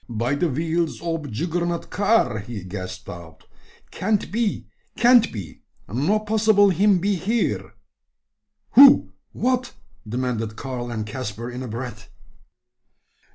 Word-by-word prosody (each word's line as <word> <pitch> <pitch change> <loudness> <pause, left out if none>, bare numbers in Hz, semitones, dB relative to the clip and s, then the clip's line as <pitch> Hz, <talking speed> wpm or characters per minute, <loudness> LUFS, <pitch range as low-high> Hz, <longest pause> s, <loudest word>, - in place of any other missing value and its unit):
"By 120 +3 -1
de 165 +4 0
wheels 160 +3 -1
ob 165 -5 -3
Juggernaut 170 +7 -2
car!" 200 - +2
he 105 -1 -7
gasped 95 0 -7
out. 85 -2 -10 0.5
"Can't 205 +2 -1
be 225 -1 -1 0.3
can't 240 0 +5
be; 100 -8 -8 0.3
no 145 - +1
possible 215 -1 +3
him 195 +2 +3
be 200 +3 0
here." 195 - -1 1.0
"Who? 275 +2 +7 0.2
What?" 255 0 -1 0.4
demanded 115 -2 -2
Karl 125 -2 -5
and 110 -2 -3
Caspar, 115 +1 -6
in 125 +1 -6
a 130 - -5
breath. 115 -2 -7
150 Hz, 120 wpm, -23 LUFS, -, 1.0 s, Who